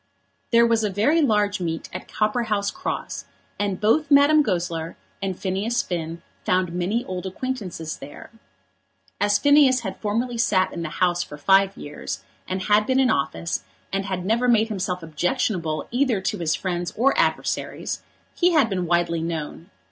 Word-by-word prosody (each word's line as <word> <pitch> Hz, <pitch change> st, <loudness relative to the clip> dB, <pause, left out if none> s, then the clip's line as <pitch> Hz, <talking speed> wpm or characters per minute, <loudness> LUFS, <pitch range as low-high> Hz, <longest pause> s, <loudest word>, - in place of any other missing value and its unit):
There 235 Hz, 0 st, +6 dB
was 230 Hz, -1 st, +2 dB
a 210 Hz, -, +1 dB
very 230 Hz, -, +2 dB
large 210 Hz, -6 st, +2 dB
meet 165 Hz, -2 st, -3 dB
at 185 Hz, -, -6 dB
Copperhouse 215 Hz, -2 st, 0 dB
Cross, -, -, -4 dB, 0.3 s
and 200 Hz, -2 st, -1 dB
both 275 Hz, +8 st, +2 dB
Madame 290 Hz, +2 st, +6 dB
Goesler 170 Hz, -, -2 dB, 0.3 s
and 190 Hz, -2 st, -2 dB
Phineas 200 Hz, +5 st, -1 dB
Finn 170 Hz, -1 st, -4 dB, 0.2 s
found 180 Hz, -2 st, +1 dB
many 190 Hz, +7 st, -1 dB
old 185 Hz, 0 st, -4 dB
acquaintances 190 Hz, -7 st, -4 dB
there. 140 Hz, +1 st, -11 dB, 0.9 s
As 205 Hz, 0 st, +3 dB
Phineas 285 Hz, -3 st, +5 dB
had 190 Hz, -5 st, -5 dB
formerly 230 Hz, +3 st, -1 dB
sat 185 Hz, -4 st, +2 dB
in 170 Hz, -, -4 dB
the 160 Hz, -, -3 dB
House 175 Hz, +1 st, +1 dB
for 150 Hz, -, -7 dB
five 195 Hz, +5 st, +3 dB
years, 145 Hz, 0 st, -6 dB, 0.2 s
and 185 Hz, 0 st, -2 dB
had 210 Hz, +1 st, +3 dB
been 260 Hz, 0 st, +3 dB
in 260 Hz, -1 st, +4 dB
office, 160 Hz, -, -1 dB, 0.3 s
and 195 Hz, 0 st, 0 dB
had 185 Hz, -2 st, -3 dB
never 230 Hz, +5 st, +2 dB
made 225 Hz, -2 st, +4 dB
himself 185 Hz, -4 st, -3 dB
objectionable 165 Hz, -, -1 dB
either 245 Hz, -4 st, +2 dB
to 190 Hz, -, -2 dB
his 165 Hz, -2 st, +1 dB
friends 175 Hz, -2 st, -3 dB
or 260 Hz, +5 st, +4 dB
adversaries, -, -, -1 dB, 0.3 s
he 355 Hz, 0 st, +3 dB
had 275 Hz, -9 st, +4 dB
been 180 Hz, -2 st, -1 dB
widely 170 Hz, -1 st, +1 dB
known. 165 Hz, +1 st, -5 dB
195 Hz, 165 wpm, -23 LUFS, 175-235 Hz, 0.9 s, There